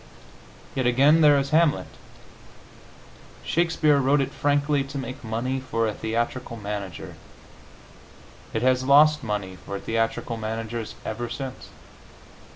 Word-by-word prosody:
Yet 130 Hz, -2 st, 0 dB
again, 140 Hz, +6 st, +5 dB
there 145 Hz, -2 st, +6 dB
is 140 Hz, 0 st, -1 dB
"Hamlet." 160 Hz, -1 st, +3 dB, 1.6 s
Shakespeare 165 Hz, -3 st, +2 dB
wrote 140 Hz, +2 st, +3 dB
it 135 Hz, 0 st, -1 dB
frankly 145 Hz, 0 st, +1 dB
to 135 Hz, +1 st, -7 dB
make 130 Hz, +1 st, -6 dB
money 120 Hz, +4 st, -2 dB
for 115 Hz, -3 st, -1 dB
a 105 Hz, -, -2 dB
theatrical 115 Hz, +2 st, -3 dB
manager; 100 Hz, -5 st, -6 dB, 1.3 s
it 110 Hz, -, -2 dB
has 130 Hz, 0 st, +3 dB
lost 150 Hz, +2 st, +5 dB
money 100 Hz, -4 st, -3 dB
for 100 Hz, 0 st, -5 dB
theatrical 115 Hz, +1 st, -2 dB
managers 110 Hz, +1 st, -4 dB
ever 120 Hz, +2 st, -4 dB
since. 130 Hz, +2 st, -7 dB
130 Hz, 120 wpm, -25 LUFS, 115-140 Hz, 1.6 s, there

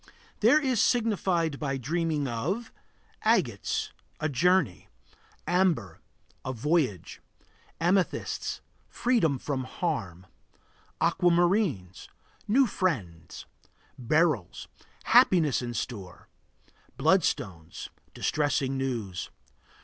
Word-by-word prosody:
There 300 Hz, -, +5 dB
is 260 Hz, -6 st, +1 dB
signified 190 Hz, -, +1 dB
by 135 Hz, -3 st, -2 dB
dreaming 155 Hz, +2 st, -1 dB
of 165 Hz, -, -3 dB, 0.5 s
Agates -, -, 0 dB, 0.3 s
A 155 Hz, -, -1 dB
journey. 150 Hz, -, +1 dB, 0.6 s
Amber 165 Hz, -, +1 dB, 0.4 s
A 130 Hz, -, -3 dB
voyage 130 Hz, -, -1 dB, 0.6 s
Amethysts 180 Hz, +2 st, 0 dB, 0.3 s
Freedom 225 Hz, -, +1 dB
from 130 Hz, 0 st, -3 dB
harm. 110 Hz, -, -3 dB, 0.7 s
Aquamarines 175 Hz, -, +1 dB, 0.4 s
New 260 Hz, +6 st, +4 dB
friends. 105 Hz, -, -3 dB, 0.5 s
Beryls 135 Hz, -, 0 dB, 0.4 s
Happiness 160 Hz, -9 st, +4 dB
in 120 Hz, -1 st, -5 dB
store. 100 Hz, -6 st, -6 dB, 0.7 s
Bloodstones 85 Hz, -3 st, 0 dB, 0.3 s
Distressing 140 Hz, -3 st, 0 dB
news. 115 Hz, -9 st, -3 dB
150 Hz, 80 wpm, -28 LUFS, 115-180 Hz, 0.7 s, There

